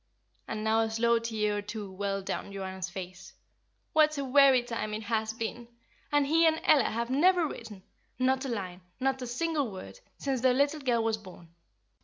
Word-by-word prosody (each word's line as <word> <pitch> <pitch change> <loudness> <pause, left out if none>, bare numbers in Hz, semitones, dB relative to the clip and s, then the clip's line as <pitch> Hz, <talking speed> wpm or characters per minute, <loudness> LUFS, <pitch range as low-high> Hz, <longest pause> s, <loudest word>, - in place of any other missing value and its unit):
And 215 - -4
now 220 +1 +2
a 225 0 +1
slow 230 +1 +2
tear 215 -2 -1
or - - -2
two 210 -1 -7
welled 195 0 -3
down 200 - -4
Joanna's 190 -1 -5
face. 185 +1 -9 0.6
"What 305 -1 +4
a 280 - -2
weary 265 -1 +5
time 230 -3 -4
it 215 - -5
has 220 +1 -1
been! 230 +1 -5 0.4
And 290 -1 +3
he 325 +3 +4
and 320 0 +2
Ella 275 -7 +5
have 235 +2 -3
never 350 +5 +4
written 215 -8 -9 0.3
not 260 +1 +1
a 270 - -3
line, 190 -6 -4 0.2
not 265 0 0
a 250 - -4
single 290 +1 -1
word, 190 - -9 0.2
since 270 -3 -2
their 255 -1 +4
little 285 +3 +2
girl 245 -5 +1
was 225 -1 0
born." 185 -5 -14
230 Hz, 190 wpm, -29 LUFS, 205-270 Hz, 0.6 s, weary